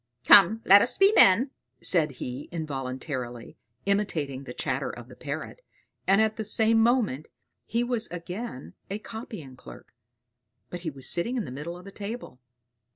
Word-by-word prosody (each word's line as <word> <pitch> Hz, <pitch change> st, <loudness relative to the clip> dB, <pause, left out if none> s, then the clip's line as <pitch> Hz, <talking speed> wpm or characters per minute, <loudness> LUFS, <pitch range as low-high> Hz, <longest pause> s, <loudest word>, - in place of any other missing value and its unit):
"Come, 220 Hz, +3 st, +7 dB
let 200 Hz, -1 st, +8 dB
us 245 Hz, -, +1 dB
be 395 Hz, +2 st, +5 dB
men!" 235 Hz, -, +6 dB, 0.3 s
said 155 Hz, -5 st, +3 dB
he, 125 Hz, +2 st, -7 dB
involuntarily 130 Hz, -5 st, -5 dB, 0.3 s
imitating 160 Hz, -10 st, -1 dB
the -, -, -7 dB
chatter -, -, -2 dB
of -, -, -9 dB
the -, -, -12 dB
Parrot, -, -, -6 dB, 0.4 s
and 195 Hz, +2 st, +5 dB
at 220 Hz, 0 st, +2 dB
the 220 Hz, -, -2 dB
same 220 Hz, +2 st, +3 dB
moment 225 Hz, -, +1 dB, 0.4 s
he 235 Hz, +1 st, 0 dB
was 240 Hz, -2 st, -1 dB
again 175 Hz, -, -7 dB, 0.2 s
a 200 Hz, -, -3 dB
copying 215 Hz, -, -9 dB
clerk; 125 Hz, -, -14 dB, 0.8 s
but 175 Hz, -, -5 dB
he 170 Hz, -2 st, -4 dB
was 135 Hz, -3 st, -6 dB
sitting 235 Hz, +9 st, 0 dB
in 225 Hz, -, -2 dB
the -, -, -8 dB
middle 150 Hz, +6 st, -6 dB
of 180 Hz, -, -14 dB
the 200 Hz, -, -10 dB
table. 205 Hz, -, -7 dB
190 Hz, 160 wpm, -27 LUFS, 140-220 Hz, 0.8 s, let